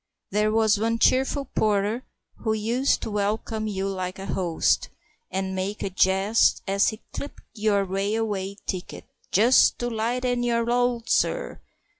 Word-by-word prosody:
There 210 +2 +2
was 220 -2 +3
one 230 +1 +1
cheerful 265 +4 +2
porter 215 +1 0 0.3
who 220 -2 -1
used 235 +5 0
to 220 - -4
welcome 215 +2 -1
you 195 -2 -2
like 185 -1 -4
a 195 - -7
host, 175 -5 0 0.4
and 190 0 -2
make 190 +3 -3
a 195 - -3
jest 190 +4 +3
as 195 +1 +3
he 220 - -9
clipped 285 - -7
your 210 -2 +1
railway 200 0 -2
ticket 185 -2 -5 0.3
"Just 235 +7 +5
to 240 0 -3
lighten 245 +2 -1
your 235 -1 +1
load, 240 -1 0
sir!" - - 0
215 Hz, 145 wpm, -25 LUFS, 195-235 Hz, 0.4 s, Just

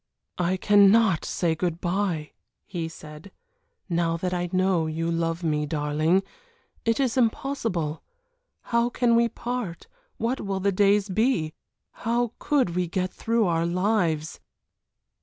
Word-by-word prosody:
"I 180 +1 +1
cannot 205 -1 +5
say 170 -3 0
good 170 0 -2
bye," 175 -4 -1 0.3
he 165 -2 -4
said, 155 +3 -11 0.6
"now 170 -2 0
that 180 +2 -2
I 175 0 -2
know 185 -3 +2
you 165 +1 -2
love 165 +1 -1
me, 150 -2 0
darling; 155 +4 +1 0.6
it 230 +2 +1
is 260 -2 +1
impossible. 225 - -1 0.6
How 235 0 +1
can 240 -1 +2
we 235 0 +3
part 240 -7 -5 0.3
what 245 +4 -1
will 195 -1 -2
the 200 +1 +1
days 200 +1 +3
be 190 - +1 0.5
how 235 0 0
could 275 -11 +1
we 180 +1 -1
get 185 +2 -2
through 230 -1 +1
our 165 -1 +1
lives?" 175 -4 0
185 Hz, 135 wpm, -25 LUFS, 165-225 Hz, 0.6 s, cannot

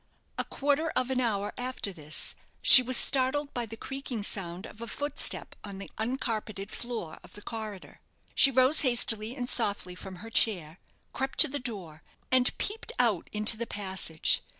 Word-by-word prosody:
A - - 0
quarter 290 +3 -2
of 255 +1 -1
an 255 -1 -1
hour 205 -4 -2
after 250 -5 -3
this, 155 -3 -2 0.3
she 255 - +12
was 255 0 +2
startled 280 +2 +2
by 240 -2 -4
the 225 +1 -10
creaking 270 -4 -6
sound 185 -1 -3
of 225 - -13
a 235 - -7
footstep 290 +5 -2
on 200 -2 -9
the 195 - -10
uncarpeted 220 -4 -4
floor 230 -10 -7
of - - -17
the 205 - -13
corridor. 215 -4 -9 0.3
She 275 - +6
rose 260 +3 +4
hastily 235 -3 +3
and 245 -3 -5
softly 205 -7 -1
from 185 +1 -10
her 225 +5 -12
chair, 180 -8 0 0.3
crept 265 0 -4
to 315 - +8
the 285 +1 -5
door, 190 -11 -9 0.3
and 255 -1 +1
peeped 430 +2 -4
put 230 -8 0
into 215 +1 +3
the 235 +1 -5
passage. 190 -5 -2
225 Hz, 175 wpm, -27 LUFS, 200-255 Hz, 0.3 s, she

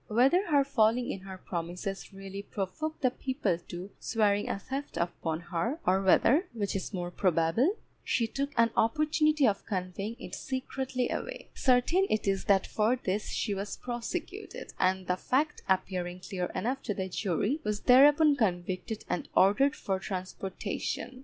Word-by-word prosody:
Whether 270 - +3
her 290 -4 +4
failing 245 -2 +2
in - - -5
her 190 0 -9
promises 180 +3 -5
really 195 0 -7
provoked 215 +12 -4
the 255 - +4
people 255 - -1
to 180 +3 -7
swearing 205 -2 +1
a - - -1
theft 270 +7 -5
upon 170 -1 -2
her, 175 - -2
or 190 +1 +3
whether 255 - +4
(which 205 -4 -2
is 190 - -3
more 175 -3 -4
probable) 185 - +2 0.3
she 235 - +1
took 275 +5 -3
an 230 0 +4
opportunity 305 +3 +3
of 200 -2 0
conveying 195 +3 -3
it - - -9
secretly 260 -1 -3
away, - - -5
certain 275 +9 +3
it 215 - 0
is 195 -1 0
that 195 -3 +4
for 220 +3 +1
this 210 -4 -2
she 210 - -1
was 200 +1 -4
prosecuted, 305 - -5
and 185 0 +2
the 180 +1 0
fact 290 +9 0
appearing 180 -1 0
clear 185 -1 -3
enough 260 +4 -1
to 210 - -3
the 190 -1 -2
jury, 200 - -1
was 210 -1 -2
thereupon 290 +4 +6
convicted 185 -1 -2
and 180 - -3
ordered 235 +9 +4
for 190 -1 -2
transportation. 195 +6 -4
210 Hz, 160 wpm, -30 LUFS, 190-265 Hz, 0.3 s, thereupon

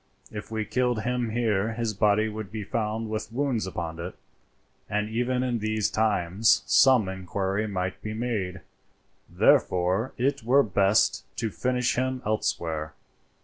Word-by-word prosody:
"If 105 -1 -7
we 110 -1 -2
killed 125 +1 0
him 125 -1 -1
here 110 -2 0
his 115 -1 -2
body 105 +1 +3
would 110 -3 -6
be 110 -1 -4
found 110 +1 -2
with 110 0 -4
wounds 125 -5 -1
upon 85 -3 -5
it, 90 +2 -6 0.7
and 105 0 0
even 125 +3 0
in 120 -2 -1
these 110 -1 0
times 105 -1 +2
some 130 -7 +5
inquiry 95 +2 -2
might 95 -2 -3
be 110 0 -5
made; 105 -7 -3 0.7
therefore 90 +7 +2
it 140 +2 0
were 130 +5 +4
best 100 0 +2
to 115 -2 -2
finish 125 +8 0
him 130 0 -1
elsewhere. 80 -7 -2
110 Hz, 145 wpm, -26 LUFS, 95-120 Hz, 0.7 s, some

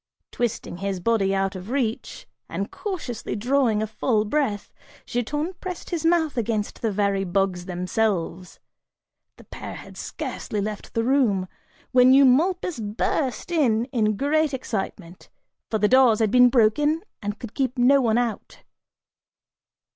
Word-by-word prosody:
Twisting 230 -6 -3
his 195 0 -3
body 195 -1 +1
out 195 0 -1
of 185 +3 -8
reach, 245 -4 -2 0.2
and - - -4
cautiously 325 - -5
drawing 230 -1 +1
a - - 0
full 220 0 0
breath, 215 -4 -1 0.3
Giton 295 +9 -2
pressed 365 0 -6
his 335 -3 -2
mouth 325 -4 +2
against 220 -2 -2
the 225 - 0
very 200 -1 0
bugs 185 -1 -1
themselves. 180 -1 -2 0.8
(The - - -15
pair - - -8
had - - -11
scarcely 210 - -5
left 210 +1 -5
the 230 - +1
room) 230 -8 +2 0.4
when 255 +1 +6
Eumolpus 305 +5 +3
burst 225 +6 -2
in 240 -9 +2
in 215 -4 +1
great 295 +1 +1
excitement, 195 -7 -5 0.4
for 220 - 0
the 210 - +3
doors 255 -2 +5
had 220 -2 +1
been 250 0 +7
broken 290 +7 +2 0.2
and 205 +1 -4
could 230 0 -9
keep 260 -2 -1
no 270 +3 +5
one 230 -2 +2
out. 240 -3 -3
230 Hz, 140 wpm, -24 LUFS, 205-270 Hz, 0.8 s, been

